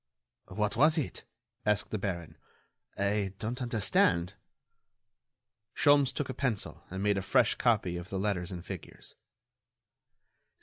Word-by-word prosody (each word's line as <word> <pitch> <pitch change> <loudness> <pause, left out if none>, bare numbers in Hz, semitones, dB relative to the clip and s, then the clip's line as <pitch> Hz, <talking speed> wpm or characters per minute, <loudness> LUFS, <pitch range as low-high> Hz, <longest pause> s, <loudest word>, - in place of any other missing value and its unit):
"What 105 +2 -1
was 155 +7 +5
it?" 150 - -3 0.4
asked 105 -1 0
the 110 - -1
baron. 85 -5 -4 0.6
"I 100 -1 0
don't 120 +5 -4
understand." 95 -6 +2 1.4
Sholmes 145 -3 +5
took 145 - -3
a 130 - -4
pencil 120 -8 -2
and 95 +2 -4
made 105 -1 +2
a - - -3
fresh 95 - +3
copy 90 0 +1
of 90 +2 -7
the 95 - -3
letters 95 -2 -1
and 90 -1 -7
figures. 95 -4 -9
100 Hz, 130 wpm, -30 LUFS, 95-120 Hz, 1.4 s, was